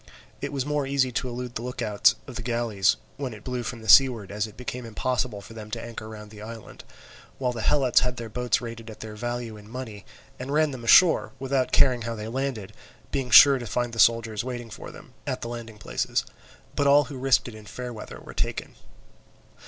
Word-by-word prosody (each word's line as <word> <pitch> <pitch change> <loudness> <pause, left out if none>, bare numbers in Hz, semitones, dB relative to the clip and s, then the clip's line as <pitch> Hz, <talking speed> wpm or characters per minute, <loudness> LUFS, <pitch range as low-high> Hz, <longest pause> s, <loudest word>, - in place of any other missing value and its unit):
It 140 - -3
was 135 -2 -2
more 145 -2 -1
easy 135 -2 +1
to 125 +1 -2
elude 125 0 -5
the 115 - -4
look 125 +1 -6
out 105 -2 +4
of 130 - -10
the - - -4
galleys, 115 -4 +1 0.2
when 130 -5 -4
it 105 - -13
blew 125 -1 -3
from 115 -1 -6
the - - -9
seaward, 115 -4 +6
as 105 +1 -1
it 105 - -15
became 125 0 -5
impossible 120 -1 -2
for 115 - -12
them 110 -1 -9
to - - -4
anchor 115 -2 -7
round 105 -1 -10
the 105 -1 -11
island; 115 +1 -9 0.5
while 125 -2 0
the 120 -2 -5
Helots 130 +3 +4
had 125 0 -1
their 115 - -5
boats 125 +1 0
rated 115 -1 -7
at 110 - -11
their 110 -1 -7
value 120 -1 -4
in 105 0 -14
money, 115 -5 -7 0.4
and 130 +2 -5
ran 155 0 +3
them 130 -3 -7
ashore, 165 +8 +6
without 135 -1 0
caring 125 -3 +4
how 115 0 -3
they 105 0 -6
landed, 115 -5 -3 0.4
being 135 -3 -2
sure 135 +4 +9
to 120 - -6
find 120 +2 -1
the 115 - -5
soldiers 115 -2 +3
waiting 120 -2 -6
for - - -8
them - - -14
at - - -2
the - - -4
landing 115 -2 -7
places. 105 - -1 0.5
But 140 - +2
all 145 +1 +7
who 135 -2 -8
risked 135 -2 +3
it 120 - -8
in 110 -1 -12
fair 125 -1 -6
weather 110 - -9
were - - -11
taken. - - -3
120 Hz, 225 wpm, -26 LUFS, 110-130 Hz, 0.5 s, sure